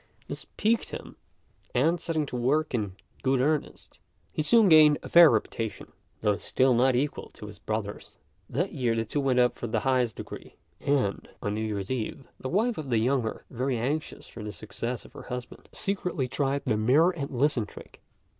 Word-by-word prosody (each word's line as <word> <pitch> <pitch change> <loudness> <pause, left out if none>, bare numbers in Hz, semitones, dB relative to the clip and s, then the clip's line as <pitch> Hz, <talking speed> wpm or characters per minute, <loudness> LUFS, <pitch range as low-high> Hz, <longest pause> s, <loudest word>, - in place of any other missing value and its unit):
This - - -7
piqued 225 +2 +1
him; - - -8 0.6
and, 160 +7 +2
setting 160 -3 -1
to 125 - -7
work 140 +6 +1
in 105 -6 -2 0.3
good 130 -1 +2
earnest, 150 +3 -1 0.3
he - - -1
soon 225 +6 +5
gained 155 -3 +7
a - - -7
fair 170 -2 +9
reputation, 110 -1 -2 0.3
though 105 -2 +2
still 130 +4 +2
not 125 +2 +4
equal 140 +4 -1
to - - -9
his 105 -1 -10
brother's. 110 -2 -4 0.3
That 175 +10 -1
year 125 -5 0
the 115 0 0
two 130 +7 -2
went 135 -2 +1
up 125 -1 +3
for 120 - -3
the 110 -1 0
highest 125 -3 +1
degree; - - -9 0.2
and, 140 -8 0
on 105 - -1
New 110 - -2
Year's 105 -2 -3
Eve, 130 +2 -3
the 130 - -4
wife 220 - +1
of 145 -4 -6
the 120 - +2
younger, 120 0 0
very 130 +1 -1
anxious 145 +7 -3
for 115 - -10
the 105 - -5
success 110 +4 -5
of - - -15
her - - -9
husband, 125 0 -7
secretly 180 -8 -2
tried 140 +2 -1
the 115 -5 +1
"mirror 140 +11 +4
and 150 -6 -5
listen" 130 -4 +1
trick. - - -13
130 Hz, 190 wpm, -28 LUFS, 115-150 Hz, 0.6 s, fair